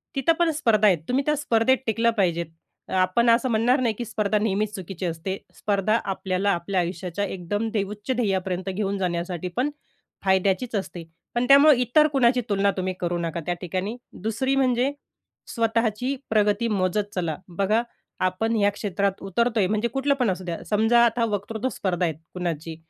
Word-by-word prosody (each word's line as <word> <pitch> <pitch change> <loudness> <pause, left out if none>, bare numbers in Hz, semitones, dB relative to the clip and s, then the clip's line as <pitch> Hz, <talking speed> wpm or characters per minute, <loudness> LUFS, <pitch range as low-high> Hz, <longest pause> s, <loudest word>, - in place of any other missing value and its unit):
तिथं 275 +5 +3
पण 340 -1 +3
स्पर्धा 225 -8 +3
आहेत. 180 -4 +4
तुम्ही 265 +3 +1
त्या 300 0 +2
स्पर्धेत 260 -2 +2
टिकलं 230 +1 +2
पाहिजे. 170 -3 +1 0.4
अ, - - -7
आपण 185 +6 +3
असं 235 +2 +3
म्हणणार 235 +4 +3
नाही 235 -3 +1
की 240 - -4
स्पर्धा 210 -1 0
नेहमीच 210 0 0
चुकीची 190 -1 -6
असते. 175 +3 -3 0.2
स्पर्धा 210 +2 +1
आपल्याला 190 0 -1
आपल्या 180 +2 -1
आयुष्याच्या 180 +2 -2
एकदम 200 +4 -3
दे 205 -2 +1
उच्च 210 +5 -5
ध्येयापर्यंत 190 -5 -1
घेऊन 200 0 -1
जाण्यासाठी 175 -1 -2
पण 265 +4 +1 0.6
फायद्याचीच 190 +5 +1
असते. 185 -3 -4 0.3
पण 240 - +1
त्यामुळं 280 +2 +8
इतर 250 +5 +3
कुणाची 255 -4 +3
तुलना 200 0 +2
तुम्ही 185 0 -1
करू 175 0 -1
नका 170 0 -3
त्या 175 - 0
ठिकाणी. 185 +6 -3 0.2
2री 230 +5 0
म्हणजे 255 0 +2 0.6
स्वतःची 230 +1 0
प्रगती 210 +1 +2
मोजत 205 0 -1
चला, 170 -4 -1 0.2
बघा 210 +3 +2 0.4
आपण 220 +5 0
ह्या 205 -2 +3
क्षेत्रात 200 -1 -2
उतरतोय 215 +1 +1
म्हणजे 215 +4 0
कुठलं 270 +4 +1
पण 250 -5 +1
असू 185 0 -2
द्या. 170 -2 -4
समजा 225 +3 +4
आता 230 0 +1
वक्तृत्व 210 +4 -2
स्पर्धा 185 -6 -1
आहे 165 - -1 0.2
कुणाची, 165 -3 -4
205 Hz, 170 wpm, -24 LUFS, 185-235 Hz, 0.6 s, त्यामुळं